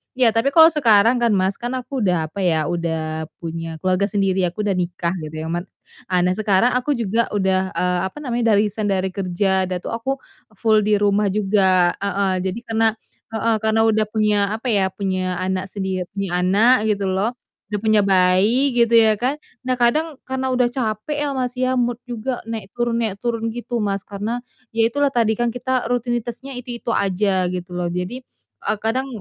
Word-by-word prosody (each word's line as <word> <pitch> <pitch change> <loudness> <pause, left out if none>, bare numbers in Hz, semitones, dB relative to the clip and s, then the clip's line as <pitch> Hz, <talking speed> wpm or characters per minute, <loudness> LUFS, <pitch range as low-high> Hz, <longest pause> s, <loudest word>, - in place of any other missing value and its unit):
Iya, 250 -3 +4
tapi 225 +3 +1
kalau 325 0 +8
sekarang 235 -4 +4
kan, 235 -1 +2
Mas, 190 +1 +1
kan 245 +2 -3
aku 255 +1 -4
udah, 180 -7 +1
apa 200 - -7
ya, 160 -4 +1
udah 160 -2 -3
punya 165 -1 -5
keluarga 185 +2 +2
sendiri, 195 -2 +1
aku 180 +5 -4
udah 205 - 0
nikah, 175 -1 -2
gitu 155 -1 -7
ya - - -5
Man. 175 +2 -3 0.4
Ah 180 -1 +2
nah, 180 - +2
sekarang 205 +3 +2
aku 255 +3 +1
juga 230 0 0
udah, 190 -1 +1
eee, 180 0 +1
apa 190 - -13
namanya, 235 -3 +1
udah 205 - +4
resign 210 0 0
dari 190 -1 0
kerja, 190 0 0
udah 185 0 -2
tuh - - -5
aku 230 +4 -2 0.4
full 220 +1 +3
di 210 - +4
rumah 205 0 +2
juga, 190 -3 +3
heeh, 200 -1 0
jadi 190 +5 -3
karena 225 0 +2 0.5
heeh, 225 0 +1
karena 220 +1 +2
udah 220 -1 +3
punya, 215 -1 +1 0.2
apa 225 +4 -6
ya, 195 -3 +2
punya 185 -2 -2
anak 185 0 -2
sendi 190 -1 -3 0.2
punya 195 -1 -2
anak, 215 +5 +4
gitu 205 -2 0
loh, 205 +6 0 0.4
udah 210 - -1
punya 215 -1 +4
bayi, 200 +7 +3
gitu, 235 -1 +3
ya 220 -2 +5
kan, 255 +5 0 0.3
nah, 255 - +2
kadang 295 +6 +1
karena 265 0 -3
udah 250 -1 +3
capek 250 +5 -2
ya, - - -1
Mas, 250 -1 -1
ya, 255 0 +1
mood 240 -1 0
juga 245 +1 -3
naik 220 -4 -6
turun 240 -1 0
naik 215 -4 -1
turun 230 -1 -2
gitu, 240 -1 -3
Mas. 200 -1 -1
Karena 210 +4 -3 0.3
ya, 225 0 +3
itulah 285 +3 0
tadi, 230 -3 +2
kan 240 +1 0
kita 255 +1 -1
rutinitasnya 245 +2 -3
itu-itu 245 -1 -6
aja, 190 -2 +1
gitu 180 0 -6
loh. 175 -1 -2
Jadi, 180 +9 -4 0.4
eee, 215 - 0
kadang 230 +5 -1
215 Hz, 190 wpm, -21 LUFS, 190-240 Hz, 0.5 s, kalau